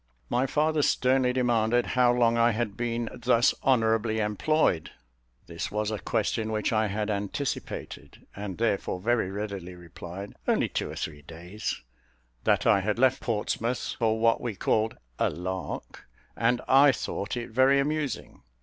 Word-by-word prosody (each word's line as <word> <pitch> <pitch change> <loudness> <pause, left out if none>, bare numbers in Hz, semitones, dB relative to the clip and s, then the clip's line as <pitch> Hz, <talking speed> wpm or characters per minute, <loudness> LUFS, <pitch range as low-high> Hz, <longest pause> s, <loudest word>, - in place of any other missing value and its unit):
My 125 +2 +2
father 155 +1 +1
sternly 130 -2 +2
demanded 120 -1 +2
how 125 -1 +3
long 120 -1 +3
I 115 0 +4
had 110 -2 -2
been 120 0 -2
thus 120 0 +3
honourably 115 -3 +2
employed. 105 - +1 0.6
This 85 0 -5
was 105 +1 -1
a 105 - -3
question 110 +4 -1
which 110 +1 0
I 110 0 +2
had 105 +1 -2
anticipated, 100 - -5
and, 100 -2 -6
therefore, 100 -5 0
very 115 -1 +1
readily 100 -3 -5
replied 90 +3 -9
"Only - - +2
two - - -2
or - - -7
three 75 -2 -5
days;" 85 +6 -6 0.6
that - - +3
I 100 - +5
had 105 +2 -1
left 130 +1 +3
Portsmouth 115 +2 -2
for 110 -1 +1
what 115 0 +3
we 120 -4 -3
called 110 +3 0 0.2
"a - - +3
lark," 90 +3 -6 0.3
and 120 +1 +1
I 140 +1 +7
thought 110 -2 -4
it 120 0 -5
very 130 +4 +4
amusing. 145 -1 -2
115 Hz, 150 wpm, -27 LUFS, 100-125 Hz, 0.6 s, I